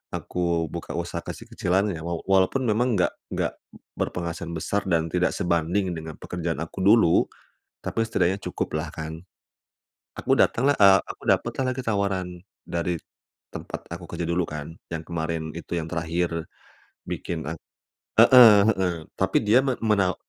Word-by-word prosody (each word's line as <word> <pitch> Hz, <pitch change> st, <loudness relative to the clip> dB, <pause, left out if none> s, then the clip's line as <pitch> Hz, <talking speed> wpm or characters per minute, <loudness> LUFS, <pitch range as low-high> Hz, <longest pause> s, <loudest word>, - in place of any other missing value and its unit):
Aku 85 Hz, -3 st, -1 dB
buka -, -, -6 dB
usaha -, -, -3 dB
kecil-kecilan 95 Hz, +3 st, -1 dB
ya. 80 Hz, -, -5 dB
Waw 85 Hz, -1 st, -3 dB
walaupun 95 Hz, +7 st, +2 dB
memang 120 Hz, +2 st, +2 dB
enggak 90 Hz, -, +2 dB, 0.2 s
nggak -, -, -1 dB, 0.5 s
berpenghasilan 85 Hz, -1 st, -3 dB
besar 100 Hz, +6 st, -1 dB
dan 80 Hz, -2 st, +1 dB
tidak 90 Hz, +1 st, +1 dB
sebanding 90 Hz, +2 st, 0 dB
dengan 80 Hz, -1 st, -7 dB
pekerjaan 85 Hz, -3 st, -3 dB
aku 85 Hz, -, -9 dB
dulu. 100 Hz, -4 st, +5 dB, 0.5 s
Tapi 115 Hz, -, -1 dB
setidaknya 95 Hz, -4 st, +1 dB
cukuplah 80 Hz, +1 st, -3 dB
kan. 80 Hz, +1 st, -6 dB, 1.0 s
Aku -, -, +1 dB
datang 130 Hz, +4 st, +3 dB
lah -, -, +1 dB
eee, 100 Hz, -1 st, +8 dB
aku -, -, -10 dB
dapet -, -, +2 dB
lah -, -, +1 dB
lagi 130 Hz, -, -4 dB
tawaran 100 Hz, -4 st, 0 dB, 0.4 s
dari 85 Hz, 0 st, -2 dB, 0.6 s
tempat -, -, -7 dB
aku -, -, -7 dB
kerja 85 Hz, -, -3 dB
dulu 85 Hz, +1 st, +1 dB
kan. 75 Hz, +1 st, -6 dB, 0.2 s
Yang 80 Hz, -1 st, -4 dB
kemarin 80 Hz, -1 st, -2 dB
itu, 85 Hz, -, -7 dB
yang 80 Hz, -, -4 dB
terakhir 85 Hz, 0 st, -2 dB, 0.6 s
bikin 80 Hz, -2 st, -4 dB
aku 80 Hz, +1 st, -5 dB, 0.6 s
heeh 125 Hz, -4 st, +10 dB, 0.2 s
heeh, 90 Hz, -2 st, 0 dB, 0.2 s
tapi -, -, +1 dB
dia 115 Hz, +5 st, +4 dB
men 130 Hz, -2 st, -1 dB
menawa 100 Hz, -5 st, +2 dB
90 Hz, 150 wpm, -25 LUFS, 85-100 Hz, 1.0 s, heeh